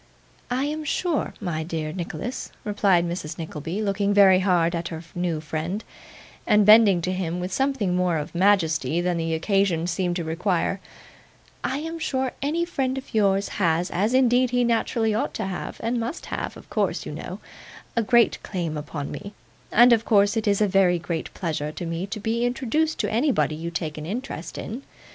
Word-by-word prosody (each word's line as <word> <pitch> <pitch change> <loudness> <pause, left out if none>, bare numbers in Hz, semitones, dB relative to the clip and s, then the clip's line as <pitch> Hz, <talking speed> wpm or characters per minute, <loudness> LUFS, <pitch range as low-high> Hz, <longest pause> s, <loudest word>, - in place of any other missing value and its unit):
'I 250 +2 0
am 305 +2 -2
sure, 320 +1 -1
my 175 -6 -2
dear 155 -1 -4
Nicholas,' 180 +6 -5
replied 195 -4 +2
Mrs. 170 -3 -5
Nickleby, 165 +5 -4
looking 200 0 0
very 190 -2 +7
hard 175 -3 +2
at 170 0 -2
her 160 0 -6
new 175 -3 -1
friend, 160 +7 -3 0.6
and 210 -1 +5
bending 210 -5 +7
to 185 - 0
him 180 -2 -2
with 180 +1 -4
something 265 -9 0
more 180 -2 +1
of 150 - -5
majesty 170 -6 +2
than 175 0 0
the 165 -1 -1
occasion 185 -1 +1
seemed 175 0 -1
to 175 - -2
require: 180 +3 0 0.8
'I 265 - -1
am 325 +2 -5
sure 265 -5 -1
any 320 +5 0
friend 270 -6 -1
of 265 - -8
yours 200 -2 +2
has, 170 0 +2
as 210 +8 +1
indeed 255 -1 +4
he 245 0 +2
naturally 230 -1 +1
ought 215 - -1
to - - -2
have, 190 -2 -5
and 235 +1 0
must 235 +8 -4
have, - - -4
of - - -14
course, - - 0
you - - -5
know, - - -7 0.6
a 230 - +3
great 235 +1 +3
claim 170 -5 -3
upon 150 -1 -5
me, 200 +1 -8 0.4
and 240 +2 +7
of 225 -1 +2
course, 205 -1 +3
it 220 -1 -1
is 200 0 +2
a 210 - +4
very 185 -2 +3
great 170 -1 -4
pleasure 155 -4 -2
to 175 - -6
me 165 +3 -3
to 215 +2 -5
be 225 +3 -1
introduced 270 +6 0
to - - -1
anybody 240 - +2
you 165 +2 -4
take 160 -2 -4
an 150 - -6
interest 230 -4 -5
in. 235 +6 -5
195 Hz, 190 wpm, -24 LUFS, 170-230 Hz, 0.8 s, very